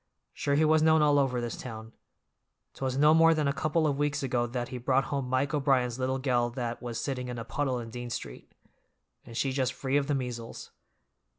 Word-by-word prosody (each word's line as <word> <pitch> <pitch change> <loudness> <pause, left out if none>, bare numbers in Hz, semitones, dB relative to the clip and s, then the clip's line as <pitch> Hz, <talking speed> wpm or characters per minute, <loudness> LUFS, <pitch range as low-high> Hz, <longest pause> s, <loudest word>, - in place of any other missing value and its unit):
Sure 140 - 0
he 155 +2 +4
was 155 0 +4
known 160 0 +5
all 145 -1 +4
over 130 -3 +1
this 120 -1 -3
town. 110 -2 -8 0.8
'Twas 130 -1 -3
no 150 +2 +6
more 165 0 +6
than 155 -2 0
a 140 - +1
couple 155 +2 0
of 145 -2 0
weeks 145 -1 0
ago 120 -2 0
that 120 0 -4
he 125 -2 -5
brought 130 +2 +2
home 135 -2 -3
Mike 130 +3 0
O'Brien's 130 -4 +1
little 130 +1 0
gell 125 -3 +1
that 120 -1 -4
was 120 -2 -4
sitting 125 -3 -3
in 125 -1 -5
a 115 - -5
puddle 135 0 -1
in 115 -2 -6
Dean 120 0 -6
Street, - - -7 0.7
and 115 - -9
she 135 - +1
just 130 -1 0
free 135 +1 0
of 140 -1 0
the 145 - +1
measles. 125 -3 -6
130 Hz, 215 wpm, -29 LUFS, 120-145 Hz, 0.8 s, no